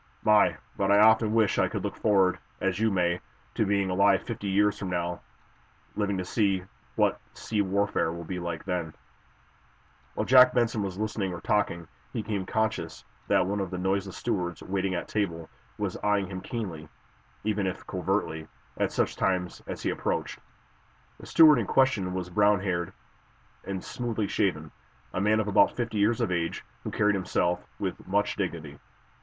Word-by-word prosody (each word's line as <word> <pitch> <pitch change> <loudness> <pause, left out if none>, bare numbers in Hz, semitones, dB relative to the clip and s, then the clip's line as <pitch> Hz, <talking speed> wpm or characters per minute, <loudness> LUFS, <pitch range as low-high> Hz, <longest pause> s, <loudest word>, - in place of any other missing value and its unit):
"My, 105 0 +4 0.2
but 100 0 +1
I 100 - +6
often 110 +1 +5
wish 110 -3 +3
I - - +3
could - - -4
look - - -3
forward, 95 -3 +2 0.2
as - - -1
you 110 0 +3
may, 90 -3 +1 0.3
to 110 - 0
being 100 -2 +1
alive 100 +1 +3
fifty 105 -4 -5
years 100 +2 +2
from 95 - -4
now 85 -1 -2 0.7
living 100 -2 0
to 90 - -3
see 100 -2 +1 0.3
what - - +2 0.2
sea 105 -2 -1
warfare 100 -3 0
will 85 0 -6
be 90 +2 -5
like 85 -2 -4
then!" 90 -4 -3 1.2
While - - -1
Jack 125 -1 +7
Benson 120 -2 +1
was 95 -2 -4
listening 105 -2 -2
or 90 - -5
talking, 85 -5 0 0.3
he 110 - -2
became 100 -4 -3
conscious 110 0 -2 0.2
that 95 -2 +3
one 100 +2 -1
of 95 -2 -2
the 90 - -4
noiseless 95 +1 -1
stewards 90 -8 -2
waiting 95 -1 -1
at 85 - -3
table 85 -6 -2 0.3
was - - -2
eyeing 105 -1 +1
him 95 0 -6
keenly, 90 -9 -5 0.5
even 105 -2 0
if 95 - -5
covertly, 90 -4 -2 0.3
at - - 0
such - - 0
times 90 -2 -1
as - - -6
he - - +1
approached. - - -2 0.8
The - - -11
steward 155 -5 +7
in 110 - -2
question 105 -9 +2
was 90 -1 -4
brownhaired 100 -3 +2 0.7
and 95 -1 -4
smoothly 115 -4 -3
shaven, 80 -7 -1 0.4
a 95 - -1
man 105 +2 +3
of 110 - -1
about 105 0 +4
fifty 115 -3 -2
years 110 +4 +2
of 110 -5 0
age 85 -2 -2 0.2
who - - -4
carried 105 0 +2
himself 90 -2 0
with - - -4
much 100 +2 +1
dignity. 80 -7 -4
100 Hz, 170 wpm, -28 LUFS, 90-105 Hz, 1.2 s, Jack